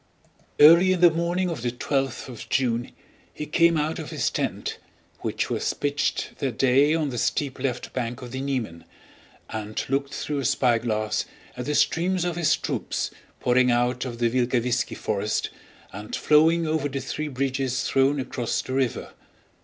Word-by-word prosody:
Early 170 +5 +8
in 180 - -2
the 175 -1 +8
morning 170 +3 0
of 160 - -5
the 120 - 0
twelfth 135 +2 -2
of 125 -3 -9
June 120 -3 0 0.4
he 150 - -6
came 170 +2 +3
out 155 +1 -1
of - - -6
his - - -1
tent, - - -3 0.4
which - - -2
was - - 0
pitched 145 0 -1
that 130 -5 -2
day 135 +4 +4
on 155 -3 0
the 120 -3 -3
steep 140 +2 -1
left 125 -2 -3
bank 125 0 -3
of 120 - -8
the 130 +1 -4
Niemen, 125 -12 -3 0.7
and 110 -1 -4
looked 140 +1 0
through 145 +1 -3
a 135 - -3
spyglass 115 -4 +1 0.3
at 125 - -5
the 150 - 0
streams 180 +3 +2
of 175 -2 -1
his 165 -4 +2
troops - - -3 0.3
pouring 125 0 +3
out 120 +1 +1
of 125 -3 -5
the 120 0 +2
Vilkavisski 125 -1 0
forest 105 0 -1 0.4
and 105 +2 -6
flowing 160 +2 +4
over 155 -2 0
the 135 0 -3
three 150 +3 -4
bridges 135 -2 -1
thrown 135 +2 +2
across 125 -2 -2
the 130 - -5
river. 130 -2 -1
135 Hz, 170 wpm, -25 LUFS, 120-150 Hz, 0.7 s, Early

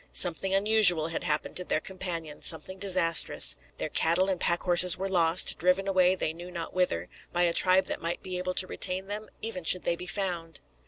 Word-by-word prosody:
Something 180 +2 +2
unusual 195 -5 +4
had 165 - -5
happened 150 0 -2
to 180 - -3
their 165 - -1
companion, 170 -5 -7
something 185 +4 -3
disastrous. 180 -4 +2 0.2
Their - - -4
cattle 180 +4 +1
and 185 -2 -2
pack 170 0 -1
horses 180 -1 +5
were 195 - -4
lost, 175 -2 +2
driven 180 +3 +1
away 185 -1 +2
they 160 -3 -3
knew 175 +2 -11
not 170 -2 -7
whither, 135 - -1 0.2
by 175 0 0
a 170 -1 +1
tribe 185 +2 +3
that - - -5
might 170 +1 -5
be 185 -1 -5
able 185 0 -4
to 185 - +4
retain 185 0 -3
them, 210 +2 -7
even 215 -5 -6
should 180 +2 +4
they 170 - -1
be 180 +1 -9
found. 175 -5 -4
180 Hz, 205 wpm, -27 LUFS, 170-190 Hz, 0.2 s, horses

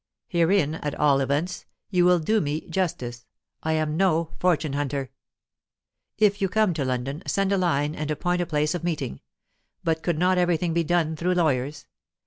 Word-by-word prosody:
Herein, 170 -3 +2
at 150 -2 -4
all 140 -2 +3
events, 145 +6 -1 0.2
you 180 -2 +3
will 180 0 +5
do 210 +7 +1
me 150 0 -2
justice; 125 -10 -3 0.3
I 160 - 0
am 155 -1 0
no 165 -4 +2
fortune 160 -5 +1
hunter. 140 -2 -2 1.1
"If 205 -1 +3
you 195 - +2
come 215 -2 +2
to 155 -3 -2
London, 130 +4 -2
send 195 0 +1
a 200 - +3
line 150 -4 +1
and 155 -1 -4
appoint 175 +4 0
a 175 - -2
place 150 0 0
of 175 - -4
meeting. 155 - -3 0.6
But 160 -1 0
could 170 0 -1
not 180 +2 +3
everything 175 -1 +1
be 170 0 +2
done 160 -1 +1
through 180 +3 0
lawyers? 150 -3 0
160 Hz, 175 wpm, -25 LUFS, 150-180 Hz, 1.1 s, will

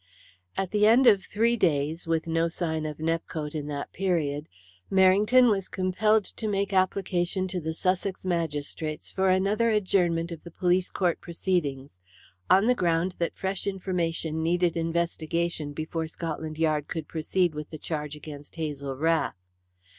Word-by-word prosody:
At 190 -2 -1
the 210 0 +4
end 240 +4 +6
of 205 -5 +6
three 230 +5 +1
days, 160 -4 0
with 165 -1 0
no 165 0 +1
sign 160 -2 -2
of 150 -1 -6
Nepcote 160 -2 -2
in 150 -2 -4
that 145 -1 -5
period, 155 -6 -1 0.4
Merrington 205 +7 +5
was 195 -2 -1
compelled 200 +3 +2
to 220 - -6
make 200 -1 -1
application 185 -1 +1
to 180 -1 -2
the 160 0 -3
Sussex 185 +2 -1
magistrates 155 -3 -3
for 190 0 +1
another 200 +5 +2
adjournment 180 -5 +1
of 165 -2 -7
the 170 - -9
police 180 +1 +1
court 175 -3 0
proceedings, 145 - -2 0.5
on 195 +3 +6
the 250 - +5
ground 175 -3 +1
that 170 - -2
fresh 190 0 -2
information 170 -4 -1
needed 175 +1 +1
investigation 165 -1 -1
before 160 +2 -3
Scotland 160 -1 -5
Yard 155 -2 +1
could 160 -3 -4
proceed 170 +2 0
with 150 0 -6
the 155 - -7
charge 150 -1 -4
against 145 -1 -10
Hazel 145 -4 -4
Rath. 160 -1 +1
170 Hz, 155 wpm, -27 LUFS, 155-190 Hz, 0.5 s, end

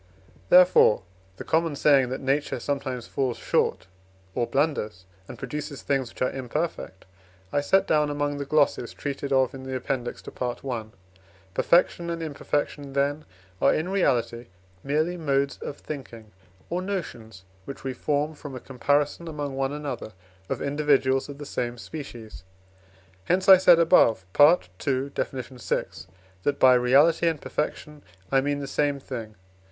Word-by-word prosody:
Therefore, 180 - +6 0.3
the - - -6
common 165 -2 +1
saying 140 -3 +4
that 130 - -4
Nature 140 +2 0
sometimes 130 -4 -3
falls 130 -3 -2
short, - - 0 0.5
or 120 +2 -1
blunders, 110 -10 -1 0.2
and - - -9
produces 150 -1 -6
things 135 -3 0
which - - -4
are 130 - +1
imperfect, 135 - -4 0.5
I 145 - +2
set 190 +7 +3
down 150 -1 +2
among 145 0 -2
the 140 - -3
glosses 140 -4 +1
treated 140 0 -4
of 130 -2 +3
in 135 - -8
the 130 0 -5
Appendix 125 -1 -3
to - - -9
Part 125 +1 -4
I. 120 -5 -3 0.7
Perfection 170 - +2
and 165 -1 -3
imperfection, 145 -2 -3
then, 145 +2 0 0.4
are - - +4
in 160 +4 -2
reality 120 - 0 0.4
merely 155 +5 0
modes 140 -4 0
of 145 - -6
thinking, 115 -7 -9 0.4
or 175 +1 -2
notions 120 - -6 0.2
which 140 - -8
we 135 -1 -3
form 150 +4 -1
from 145 -3 -9
a - - -5
comparison 145 +6 0
among 145 -3 -4
one 135 0 -1
another 140 -7 -5 0.4
of - - -2
individuals 140 -2 +2
of 140 - -8
the 145 - -8
same 120 -3 -3
species; 120 - -9 0.8
hence 185 +2 +1
I 190 -1 +10
said 180 -2 +6
above 160 - +4
(II. 140 - +3
Def. - - -1
vi.), 130 -1 -3 0.6
that 140 +7 0
by 130 -1 +7
reality 140 +7 +4
and 160 -2 0
perfection 150 0 -4 0.3
I 135 -1 +4
mean 145 +1 -1
the - - -4
same 140 0 0
thing. 115 -5 -7
140 Hz, 155 wpm, -25 LUFS, 130-150 Hz, 0.8 s, I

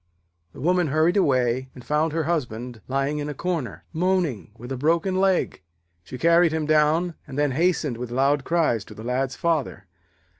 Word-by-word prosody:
The - - -11
woman 180 +2 +2
hurried 155 +5 +2
away 130 -7 +1
and 125 - -12
found 155 +2 +1
her 165 +1 -1
husband 125 -7 -3
lying 135 +3 -1
in 145 - -3
the 150 - -5
corner, 165 -5 -3
moaning, 170 - 0
with 120 +2 -9
a - - -1
broken 165 +7 +1
leg. 190 - +1 0.4
She 125 - -8
carried 170 +2 +4
him 160 -1 -1
down, 155 +3 +2
and 135 -1 -8
then 145 -1 +2
hastened 155 -3 0
with 125 0 -5
loud 135 +3 +1
cries 160 -11 +1
to - - -12
the 110 - -9
Lad's 130 +2 -1
father. 165 -6 -1
150 Hz, 180 wpm, -24 LUFS, 130-170 Hz, 0.4 s, carried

